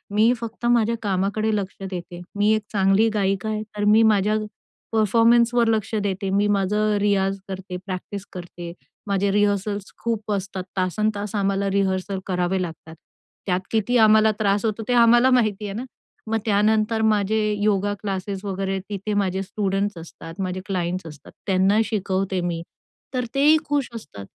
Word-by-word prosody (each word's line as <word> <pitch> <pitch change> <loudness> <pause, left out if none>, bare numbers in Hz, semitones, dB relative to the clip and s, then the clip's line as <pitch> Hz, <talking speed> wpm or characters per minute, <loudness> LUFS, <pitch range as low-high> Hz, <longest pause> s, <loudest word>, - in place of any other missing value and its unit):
मी 220 +3 +5
फक्त 230 +1 -6
माझ्या 235 -1 +3
कामाकडे 205 +2 0
लक्ष 200 -2 -3
देते. 175 -1 -7
मी 205 +1 +3
एक 215 - -1
चांगली 195 +2 +3
गायिका 195 0 0
आहे 215 0 -2 0.2
तर 205 - -1
मी 215 +2 +6
माझ्या 210 -1 +3 0.6
परफॉर्मन्सवर 230 +2 +4
लक्ष 220 -1 0
देते, 195 0 -2
मी 200 +2 +2
माझं 205 +1 +1
रियाज 195 -1 +1
करते, 190 -1 -6
प्रॅक्टिस 195 +1 -6
करते, 175 -1 -8 0.4
माझे 200 0 +1
रिहर्सल्स 205 0 0
खूप 225 -2 -2
असतात. 195 -2 -3
तासंतास 205 +2 -1
आम्हाला 195 0 0
रिहर्सल 190 0 0
करावे 180 0 0
लागतात. 165 -2 -7 0.5
त्यात 180 -2 +1
किती 225 +3 +1
आम्हाला 220 -1 +6
त्रास 205 0 +1
होतो 220 0 -1
ते 250 - +1
आम्हाला 240 +1 +6
माहिती 215 -5 +2
आहे 200 - -4
ना. 230 +5 -4 0.5
मग 225 - +1
त्यानंतर 215 +1 +2
माझे 215 -1 +2 0.3
योगा 205 -1 +1
क्लासेस 195 -1 -4
वगैरे 195 0 -2
तिथे 205 +1 -3
माझे 190 -2 0
स्टुडंट्स 200 -1 -2
असतात, 165 0 -10
माझे 185 -1 -3
क्लायंट्स 185 -1 -2
असतात 150 -3 -12 0.2
त्यांना 195 +2 +3
शिकवते 195 -3 -1
मी. 170 -1 -2 0.5
तर 250 -1 -1
तेही 295 +3 +5
खुश 285 -3 0
असतात. 125 - -9
200 Hz, 155 wpm, -23 LUFS, 190-215 Hz, 0.6 s, मी